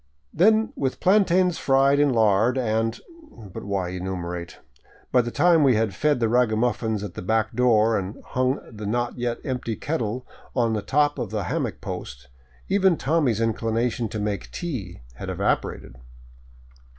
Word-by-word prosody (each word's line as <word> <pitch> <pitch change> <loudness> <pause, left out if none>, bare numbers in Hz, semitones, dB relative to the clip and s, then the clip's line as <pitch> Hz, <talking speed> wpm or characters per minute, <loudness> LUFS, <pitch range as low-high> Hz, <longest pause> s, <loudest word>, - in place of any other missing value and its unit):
Then 220 +6 +3
with 130 -1 -2
plantains 185 -2 +3
fried 135 +1 +3
in 145 0 +4
lard 110 +2 +3
and 115 -2 0 0.2
— 310 - -20 0.2
But - - -7
why 100 -3 -2
enumerate? 90 -2 -5 0.5
By 125 - +5
the 120 - -4
time 170 +4 +4
we 130 -4 +5
had 110 -2 0
fed 145 +8 +1
the 115 - +2
ragamuffins 110 -2 +1
at 100 -4 -6
the - - -7
back 110 +3 0
door 115 -3 +3
and 95 +2 -5
hung 130 +2 0
the 105 -2 -7
not 120 +3 -2
yet 120 -1 -1
empty 125 -4 -3
kettle 125 -5 -3 0.3
on 115 -3 +2
the 105 - -1
top 145 +5 +1
of - - -4
a - - -1
hammock - - -3
post, 65 +3 -7 0.4
even 190 -4 +3
Tommy's 135 -7 +1
inclination 115 +1 -1
to 110 - -5
make 105 -1 -3
tea 120 - -6 0.2
had - - -6
evaporated. - - -2
115 Hz, 160 wpm, -24 LUFS, 105-135 Hz, 0.5 s, By